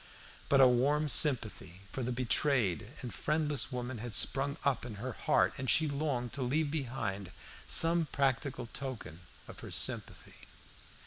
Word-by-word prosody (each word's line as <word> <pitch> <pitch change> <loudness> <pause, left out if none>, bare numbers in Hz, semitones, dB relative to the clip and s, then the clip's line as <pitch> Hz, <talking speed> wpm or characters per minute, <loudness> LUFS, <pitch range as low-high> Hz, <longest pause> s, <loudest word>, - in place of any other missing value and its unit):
But 140 - +4
a 130 - +8
warm 140 +5 +2
sympathy 110 - +2
for 135 - -4
the 125 0 -2
betrayed 120 - +1 0.2
and 120 - -6
friendless 150 -5 0
woman 125 -1 -4
had 120 0 -5
sprung 140 +2 0
up 140 -4 +1
in 120 -3 -6
her 125 +5 -5
heart, - - +1
and 130 -1 -3
she 160 - +4
longed 140 -5 -2
to 140 - -4
leave 145 +4 0
behind 120 - -3 0.4
some 165 0 +3
practical 135 -2 -1
token 120 - -7 0.3
of - - -11
her - - -9
sympathy. - - -3
130 Hz, 150 wpm, -32 LUFS, 120-145 Hz, 0.4 s, a